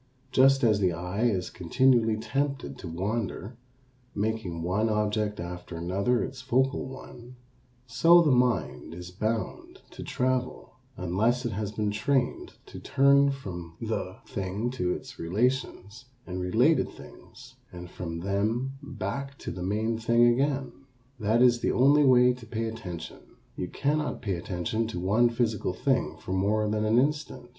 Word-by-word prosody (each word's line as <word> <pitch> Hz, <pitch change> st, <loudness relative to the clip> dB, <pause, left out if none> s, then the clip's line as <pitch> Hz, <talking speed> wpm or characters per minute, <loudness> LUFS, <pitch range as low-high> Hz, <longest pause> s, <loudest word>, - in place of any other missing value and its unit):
Just 135 Hz, +1 st, +5 dB
as 110 Hz, -3 st, +4 dB
the 90 Hz, -3 st, +2 dB
eye 90 Hz, +7 st, -2 dB
is 95 Hz, -6 st, 0 dB
continually 115 Hz, +4 st, +2 dB
tempted 140 Hz, +4 st, -3 dB
to -, -, -7 dB
wander, 100 Hz, +4 st, -3 dB, 0.6 s
making 100 Hz, -6 st, -2 dB
one 100 Hz, +6 st, +1 dB
object 105 Hz, -1 st, 0 dB
after 90 Hz, 0 st, -6 dB
another 100 Hz, +8 st, 0 dB
its 130 Hz, -1 st, -6 dB
focal 130 Hz, +2 st, +1 dB
one, 125 Hz, -2 st, -11 dB, 0.5 s
so 165 Hz, +8 st, +6 dB
the 150 Hz, -, +3 dB
mind 125 Hz, -8 st, 0 dB
is 90 Hz, 0 st, -9 dB
bound 110 Hz, +4 st, -3 dB
to -, -, -10 dB
travel 125 Hz, -2 st, -2 dB, 0.2 s
unless 105 Hz, +8 st, 0 dB
it 120 Hz, -, -1 dB
has 105 Hz, 0 st, -3 dB
been 105 Hz, -1 st, -1 dB
trained 125 Hz, +4 st, -1 dB
to -, -, -10 dB
turn 140 Hz, +1 st, +4 dB
from 90 Hz, -11 st, -6 dB
the -, -, -3 dB
thing 100 Hz, +5 st, -3 dB
to 90 Hz, -9 st, -1 dB
its -, -, -6 dB
relations 110 Hz, +3 st, -2 dB, 0.2 s
and 90 Hz, 0 st, -5 dB
related 90 Hz, 0 st, +3 dB
things 125 Hz, 0 st, -14 dB, 0.2 s
and 90 Hz, 0 st, -9 dB
from 85 Hz, -2 st, -5 dB
them 110 Hz, +8 st, -1 dB
back 140 Hz, 0 st, -5 dB
to -, -, -6 dB
the 90 Hz, -, -7 dB
main 110 Hz, +4 st, -1 dB
thing 115 Hz, +1 st, +4 dB
again. 135 Hz, +2 st, 0 dB, 0.5 s
That 110 Hz, +3 st, +3 dB
is 120 Hz, -1 st, +5 dB
the -, -, 0 dB
only 140 Hz, +4 st, +5 dB
way 125 Hz, -1 st, +6 dB
to 125 Hz, -2 st, -12 dB
pay 115 Hz, +1 st, -3 dB
attention. 90 Hz, -8 st, -7 dB, 0.4 s
You 90 Hz, -, -3 dB
cannot 150 Hz, +5 st, -1 dB
pay 100 Hz, -4 st, -1 dB
attention 90 Hz, +5 st, -2 dB
to 100 Hz, -6 st, -5 dB
one 105 Hz, +7 st, +3 dB
physical 115 Hz, -5 st, -1 dB
thing 130 Hz, -, 0 dB
for 85 Hz, +4 st, -6 dB
more 105 Hz, +3 st, +1 dB
than 105 Hz, 0 st, 0 dB
an 110 Hz, +2 st, +3 dB
instant. 145 Hz, -2 st, -1 dB
110 Hz, 150 wpm, -27 LUFS, 95-125 Hz, 0.6 s, so